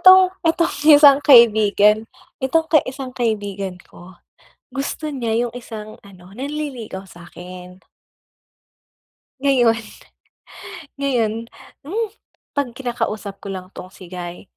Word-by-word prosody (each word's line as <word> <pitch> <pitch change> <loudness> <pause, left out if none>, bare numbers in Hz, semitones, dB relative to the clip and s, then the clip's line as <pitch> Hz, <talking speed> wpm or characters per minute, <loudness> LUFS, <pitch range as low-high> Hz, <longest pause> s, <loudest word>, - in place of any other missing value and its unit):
itong, 370 0 +7 0.2
itong 330 0 +1
isang 290 -2 +8
kaibigan, 220 -4 +5 0.3
itong 320 +5 +1
ka 310 - +7
isang 260 -1 -6
kaibigan 205 -6 -3
ko, 175 0 -15 0.6
gusto 280 +3 -3
niya 240 -3 -1
'yong 235 - -9
isang 215 -3 -8
ano, 190 -1 -16
nanliligaw 260 -8 -6
sa'kin. 180 +1 -12 1.6
Ngayon 255 -5 +4 1.3
ngayon, 240 -6 +1 0.5
hmm, 440 +5 -1 0.4
'pag 285 -2 -1
kinakausap 220 -5 -4
ko - - -10
lang 185 -1 -7
'tong 185 - -9
si 185 -1 -14
guy, 175 -1 -7
230 Hz, 105 wpm, -20 LUFS, 195-275 Hz, 1.6 s, isang